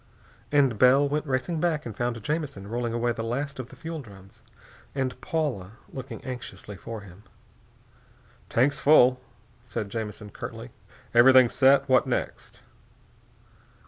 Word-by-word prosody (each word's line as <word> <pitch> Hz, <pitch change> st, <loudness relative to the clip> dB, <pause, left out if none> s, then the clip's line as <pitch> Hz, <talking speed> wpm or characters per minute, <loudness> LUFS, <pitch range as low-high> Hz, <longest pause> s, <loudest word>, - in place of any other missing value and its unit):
And 135 Hz, -7 st, +3 dB
Bell 135 Hz, +3 st, +6 dB
went 150 Hz, +2 st, -2 dB
racing 135 Hz, +5 st, -1 dB
back 155 Hz, -3 st, 0 dB
and 115 Hz, -, -6 dB
found 120 Hz, -1 st, -3 dB
Jamison 145 Hz, -10 st, -3 dB
rolling 120 Hz, +1 st, -2 dB
away 120 Hz, +1 st, 0 dB
the 115 Hz, -1 st, -4 dB
last 135 Hz, +5 st, -3 dB
of 125 Hz, -1 st, -6 dB
the -, -, -13 dB
fuel 160 Hz, -1 st, -6 dB
drums 100 Hz, -5 st, -15 dB, 0.5 s
and 130 Hz, -2 st, -2 dB
Paula 145 Hz, -, -2 dB, 0.2 s
looking 130 Hz, -1 st, -8 dB
anxiously 105 Hz, -5 st, -7 dB
for 110 Hz, +3 st, -7 dB
him. 100 Hz, -1 st, -14 dB, 1.3 s
"Tanks 140 Hz, +4 st, +2 dB
full," 130 Hz, -4 st, +5 dB, 0.4 s
said 105 Hz, -, -5 dB
Jamison 105 Hz, -2 st, -5 dB
curtly. -, -, -8 dB, 0.4 s
"Everything 125 Hz, +1 st, +7 dB
set. 135 Hz, +2 st, +4 dB
What 130 Hz, -1 st, +4 dB
next?" -, -, -4 dB
125 Hz, 135 wpm, -26 LUFS, 115-140 Hz, 1.3 s, Everything